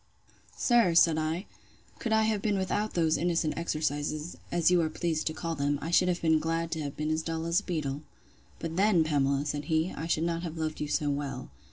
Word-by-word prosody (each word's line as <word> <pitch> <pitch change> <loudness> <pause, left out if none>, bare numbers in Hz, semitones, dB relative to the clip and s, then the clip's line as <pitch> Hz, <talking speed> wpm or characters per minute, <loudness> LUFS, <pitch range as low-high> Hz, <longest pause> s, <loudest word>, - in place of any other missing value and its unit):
Sir, 230 -9 +3
said 165 -1 +5
I, 160 +5 -2 0.5
could 230 - -3
I 220 0 +4
have 215 -2 0
been 205 -2 +1
without 205 +3 -1
those 160 -2 +2
innocent 170 -2 0
exercises, 155 -1 -2 0.2
as 170 0 +3
you 180 -1 +4
are 160 - 0
pleased 160 -1 -2
to 155 - -1
call 165 0 -3
them, 145 -1 0
I 165 - -4
should 180 +1 +4
have 180 -1 -1
been 160 -1 +4
glad 165 +1 -2
to 160 - -2
have 140 -2 -5
been 155 +1 -1
as 155 0 0
dull 165 0 -3
as 170 +1 +2
a - - -11
beetle. 150 -5 -3 0.6
But 165 0 -5
then, 195 -4 +4
Pamela, 140 -2 +1
said 145 0 -3
he, 160 +1 +1
I 160 - -5
should 160 -1 +1
not 170 0 -1
have 170 -2 -5
loved 155 -1 -3
you 150 - -1
so 145 0 0
well. 140 0 -4
160 Hz, 225 wpm, -29 LUFS, 155-175 Hz, 0.6 s, said